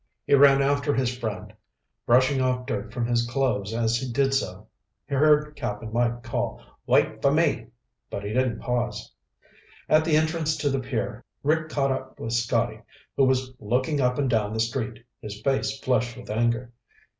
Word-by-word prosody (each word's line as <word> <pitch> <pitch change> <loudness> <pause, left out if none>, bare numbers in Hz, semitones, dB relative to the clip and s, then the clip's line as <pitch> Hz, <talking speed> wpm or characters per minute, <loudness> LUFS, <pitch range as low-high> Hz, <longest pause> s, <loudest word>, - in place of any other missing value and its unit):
He - - +1
ran 140 0 +7
after 145 +1 +1
his 125 -2 0
friend, 115 -4 -5 0.5
brushing 130 +3 +4
off 125 -1 0
dirt 105 -1 -4
from 120 0 -2
his 120 0 +1
clothes 120 -6 0
as 115 0 +1
he 125 +1 -4
did 135 +2 +1
so. 100 -6 -2 0.4
He 140 - -6
heard 150 +1 +3
Cap'n 110 -4 -5
Mike 120 0 0
call, - - -3 0.3
"Wait - - +2
for - - +4
me!" - - +1 0.4
but 100 - -5
he 105 +1 -4
didn't 125 -3 0
pause. 125 -1 -2 0.7
At 155 +1 +4
the 160 -1 +3
entrance 155 0 0
to 145 -1 0
the 135 - 0
pier, 125 -2 -3 0.2
Rick 155 +2 +1
caught 140 -3 +1
up 130 0 -5
with 115 - -4
Scotty 115 -1 0 0.3
who 135 - +4
was 130 0 +1
looking 130 +7 0
up 125 0 +1
and 140 -2 +1
down 110 -4 +1
the - - -2
street, 115 +1 -2 0.2
his 105 -1 -7
face 135 0 0
flushed 120 -3 0
with 120 -3 -8
anger. 120 +2 0
125 Hz, 180 wpm, -25 LUFS, 115-140 Hz, 0.7 s, ran